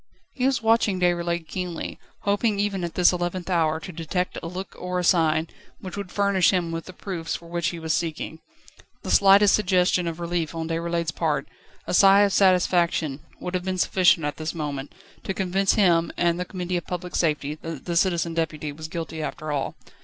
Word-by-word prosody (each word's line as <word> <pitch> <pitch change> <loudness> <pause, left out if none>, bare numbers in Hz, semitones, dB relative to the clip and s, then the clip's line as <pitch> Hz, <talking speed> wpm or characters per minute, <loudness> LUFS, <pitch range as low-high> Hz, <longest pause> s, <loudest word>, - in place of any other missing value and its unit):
He 255 0 +1
was 255 -3 0
watching 225 -4 +3
Déroulède 170 -2 0
keenly, 180 0 -5 0.2
hoping 205 +1 +1
even 200 -2 -1
at 170 - -4
this 180 0 +5
eleventh 175 +1 -3
hour 160 -2 +2
to 190 - -7
detect 175 +2 -3
a - - -5
look 185 +3 -7
or 180 0 -3
a 180 - 0
sign, 160 -2 +3 0.3
which 185 -2 -7
would 200 -3 -6
furnish 200 -3 +3
him 175 -3 0
with 165 0 -4
the - - -9
proofs 180 -4 -4
for 170 - -9
which 170 0 -1
he 175 - -3
was 160 -1 -2
seeking. 160 -1 -3 0.6
The - - -3
slightest 200 +1 +6
suggestion 180 -3 +2
of 165 0 -4
relief 170 -2 -2
on 165 -1 -3
Déroulède's 170 0 -1
part, 150 -5 -1 0.4
a - - -3
sigh 195 +2 +7
of 200 -1 +3
satisfaction, 175 -6 +2 0.2
would 180 - -5
have 180 -1 -1
been 185 0 -1
sufficient 180 -3 +3
at 145 - -3
this 155 +2 -4
moment, 145 -3 -4 0.3
to 195 - -3
convince 190 +1 +1
him 170 -5 +3
and 170 0 +1
the 180 - -2
Committee 180 -1 -3
of 175 - -6
Public 180 0 -5
Safety 150 -3 0
that 165 -4 -7
the 170 - -2
Citizen 170 -1 +1
Deputy 155 -2 -2
was 155 +2 -8
guilty 160 -1 -5
after 155 0 -4
all. 140 -2 -2
175 Hz, 200 wpm, -24 LUFS, 165-185 Hz, 0.6 s, sigh